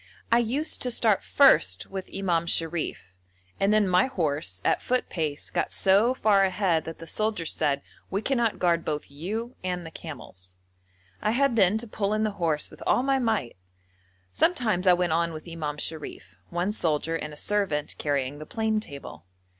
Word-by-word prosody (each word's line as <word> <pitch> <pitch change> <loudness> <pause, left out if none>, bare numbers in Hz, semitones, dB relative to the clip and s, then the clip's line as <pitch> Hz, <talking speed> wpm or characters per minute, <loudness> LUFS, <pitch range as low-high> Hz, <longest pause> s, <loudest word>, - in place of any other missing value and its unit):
I 235 - +6
used 265 +7 0
to 250 - 0
start 225 -4 +3
first 100 - +4
with 190 -1 -7
Imam 170 -4 0
Sharif, 165 - -1 0.5
and 195 +1 +3
then 215 -2 +4
my 180 +5 +4
horse, 150 - -2
at - - +2
foot 255 0 0
pace, 155 -4 -3
got - - -1
so 205 +6 +3
far 205 -5 +4
ahead 185 -4 +1
that 165 - -7
the 165 - -10
soldiers 210 -3 -1
said, 140 -3 0 0.3
'We 200 +3 -2
cannot 240 -5 +1
guard 170 -2 +2
both 150 -2 -4
you 215 - -5
and 180 -1 -3
the 165 - -8
camels.' 95 - -9 0.7
I 210 - +1
had 255 +2 +2
then 200 -1 +4
to 235 +2 -6
pull 210 -1 -1
in 215 - 0
the 215 - +1
horse 155 -3 0
with - - -14
all 250 - +3
my 270 0 +2
might. 220 - -1 0.8
Sometimes 215 - +1
I 180 - +8
went 175 -2 +1
on 170 0 +1
with 155 +2 -9
Imam 155 -3 -4
Sharif, 155 +1 -6
one 175 +3 -1
soldier 165 -5 0
and 150 -2 -4
a 150 - -11
servant 185 -6 0
carrying 140 -1 -1
the 155 - -9
plane 220 -1 0
table. 140 - -10
180 Hz, 180 wpm, -26 LUFS, 155-215 Hz, 0.8 s, I